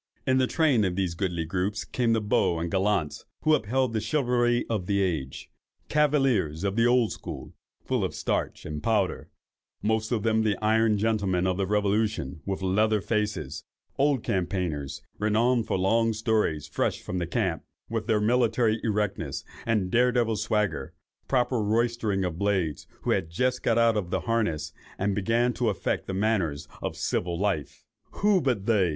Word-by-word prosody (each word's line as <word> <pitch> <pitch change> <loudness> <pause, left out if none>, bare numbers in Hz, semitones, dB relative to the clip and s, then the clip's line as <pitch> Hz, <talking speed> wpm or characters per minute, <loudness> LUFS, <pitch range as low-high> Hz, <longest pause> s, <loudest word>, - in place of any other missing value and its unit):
"In 130 0 +3
the 130 - +3
train 145 -9 +3
of 90 -2 0
these 95 -3 -1
goodly 85 -2 -2
groups 95 +5 -2
came 120 -2 +1
the 110 - +1
beaux 105 -4 +1
and 85 +1 -3
gallants, 95 -5 0 0.2
who 155 - +4
upheld 130 -1 +1
the 110 - 0
chivalry 120 -4 +1
of 105 -6 -2
the 100 -1 +1
age; 80 -9 -2 0.4
cavaliers 135 - +2
of 100 0 0
the 115 +1 +4
old 120 -2 +3
school, - - -7 0.3
full - - 0
of - - -2
starch - - -2
and 75 -1 -5
powder, 105 -5 0 0.5
most 110 +1 0
of 110 -4 0
them 110 -1 +2
the 105 -3 +1
iron 110 0 +3
gentlemen 100 -4 +1
of 95 -1 0
the 95 -1 0
revolution, 105 -7 0
with 95 -1 -2
leather 105 +3 +2
faces—old 105 - -2
campaigners, 90 -6 -2 0.2
renowned 115 +2 +2
for - - 0
long 115 +4 +2
stories, 110 - 0
fresh - - -1
from 90 - -4
the 85 - -2
camp, 90 -4 -1 0.2
with 115 -2 -3
their 110 -2 +3
military 115 0 +2
erectness 100 - -1 0.2
and 105 -5 +1
daredevil 120 -2 +3
swagger; 105 0 -1 0.3
proper 125 -2 +1
roystering 110 -2 0
blades, 90 -3 -1 0.2
who - - 0
had 80 - 0
just 125 +9 0
got 115 - +2
out 115 -1 +4
of 100 -5 -2
the - - -1
harness, 110 -10 -1 0.2
and 100 +1 0
began 115 +5 +1
to 120 -2 0
affect 100 - -2
the 95 - -3
manners 95 -8 0
of - - -4
civil 85 -1 -1
life. 95 -7 -2 0.4
Who 205 -3 +4
but 120 -9 0
they! 105 -6 +3
105 Hz, 165 wpm, -27 LUFS, 95-115 Hz, 0.5 s, who